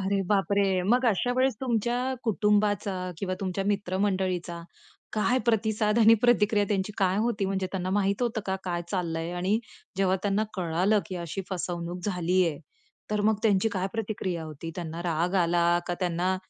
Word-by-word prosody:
अरे 195 +1 0
बापरे! 195 -1 +2
मग 245 +6 +2
अशा 235 +3 +2
वेळेस 260 -1 +3
तुमच्या 240 -1 0 0.3
कुटुंबाचा 210 -2 +1 0.3
किंवा 185 -2 -2
तुमच्या 195 0 -2
मित्रमंडळीचा 185 -3 -1 0.5
काय 230 +4 +2
प्रतिसाद 220 -1 +2
आणि 225 0 +7
प्रतिक्रिया 210 -4 +4
त्यांची 200 0 -1
काय 190 -1 +2
होती. 225 -2 0
म्हणजे 190 -1 -1
त्यांना 185 -1 -2
माहित 200 +3 +1
होतं 225 -2 0
का 190 - 0
काय 175 -1 -2
चाललंय 170 -3 -2
आणि 185 +5 +1 0.4
जेव्हा 190 -1 +2
त्यांना 205 +1 +1
कळालं 185 +4 +1
की 185 -3 -5
अशी 170 +3 -4
फसवणूक 175 -1 -3
झाली 180 -2 +1
आहे. 150 -3 -2 0.5
तर 210 -1 +1
मग 215 0 +3
त्यांची 210 0 +3
काय 190 -1 -1
प्रतिक्रिया 195 -6 -3
होती. 155 +1 -7
त्यांना 170 -1 -5
राग 175 +2 0
आला 170 0 +3
का? 175 - -1
त्यांना 180 +1 0
195 Hz, 160 wpm, -27 LUFS, 180-210 Hz, 0.5 s, आणि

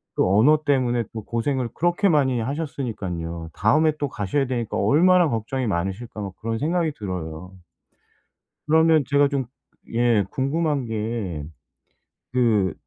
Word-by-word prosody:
그 - - +2
언어 135 +11 +4
때문에 125 -5 +1
또 110 -2 -6
고생을 125 +1 -1
그렇게 175 +3 +2
많이 135 -6 +2
하셨으니깐요. 105 - -4
'다음에 155 +9 +3
또 145 - 0
가셔야 130 +4 -1
되니까 120 -3 -3
얼마나 180 +3 +4
걱정이 115 +2 -2
많으실까.' 100 +4 -3
막 95 -2 -5
그런 115 0 -2
생각이 165 +2 0
들어요. 90 -3 -6 1.2
그러면 160 -1 +4
제가 145 0 +4
좀 140 -3 -2 0.5
예, 115 -3 +3
궁금한 145 0 0
게 110 -8 -3 0.9
그 110 -8 +2
120 Hz, 290 characters per minute, -23 LUFS, 105-145 Hz, 1.2 s, 언어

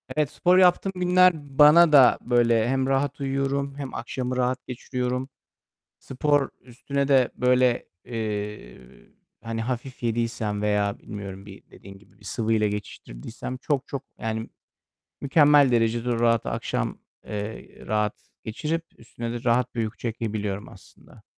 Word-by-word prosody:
Evet, 150 -3 +1
spor 180 +1 +3
yaptığım 185 +1 +4
günler 180 0 +5
bana 150 +3 +5
da 135 -4 +7
böyle, 120 -2 +2
hem 130 0 0
rahat 135 +1 0
uyuyorum 140 0 -2
hem 140 -2 -6
akşamı 125 +1 -4
rahat 130 +1 -1
geçiriyorum. 125 +1 -3 0.7
Spor 145 +1 0
üstüne 140 +3 -3
de, 130 -3 +4
böyle, 125 -1 +2 0.2
eee, 105 - -5 0.6
hani, 115 0 -4
hafif 125 +2 -5
yediysem 115 -3 -2
veya 105 -1 0
bilmiyorum 100 -2 -8
bir 100 -1 -14
dediğin 95 0 -13
gibi 105 - -24
bir - - -20
sıvı 115 -1 -2
ile 105 -1 +2
geçiştirdiysem 105 - -7
çok 140 +1 -2
çok, 140 -1 -5 0.2
yani, 110 0 -3 0.7
mükemmel 145 -1 +5
derecede 115 +1 +1
rahat 115 -1 +2
akşam, - - -3 0.3
eee, 105 +1 -7
rahat 105 0 0 0.3
geçirip 155 +9 -3
üstüne 115 0 -7
de 120 0 -6
rahat 125 0 +1
bir - - -2
uyku 110 0 -3
çekebiliyorum 105 -3 -4
aslında. - - -18
125 Hz, 135 wpm, -25 LUFS, 110-135 Hz, 0.7 s, da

